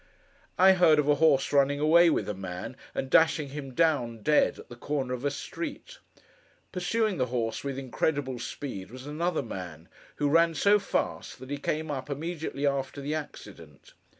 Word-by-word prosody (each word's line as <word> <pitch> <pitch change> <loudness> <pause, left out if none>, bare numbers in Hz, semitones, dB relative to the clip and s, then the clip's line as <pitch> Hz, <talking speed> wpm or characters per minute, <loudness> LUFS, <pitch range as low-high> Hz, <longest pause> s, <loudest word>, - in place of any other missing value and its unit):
I 190 +1 +7
heard 175 -5 +5
of 150 -1 +2
a 150 - +5
horse 145 -3 +3
running 140 0 +3
away 165 +3 +6
with 110 -10 0
a 105 - -2
man, 95 +4 -6 0.2
and 135 - -2
dashing 155 0 +3
him 135 -2 -7
down, 125 -9 +1
dead, 150 -1 +3
at - - -12
the 120 - -10
corner 130 0 -3
of 125 0 -5
a 145 - +2
street. 290 - -7 0.7
Pursuing 205 +3 0
the 130 -2 0
horse 115 -2 -2
with 140 -1 -4
incredible 135 0 -2
speed, 115 -11 -6
was 130 +3 -10
another 160 +2 -1
man, 90 -7 -8 0.3
who 145 - 0
ran 165 +2 +3
so 205 +5 +4
fast, 195 - -3
that 130 +2 -11
he 145 - -3
came 155 +2 -2
up, 135 0 -5
immediately 155 0 -4
after 140 0 -1
the 140 +2 -3
accident. 95 - -9
145 Hz, 180 wpm, -28 LUFS, 125-160 Hz, 0.7 s, I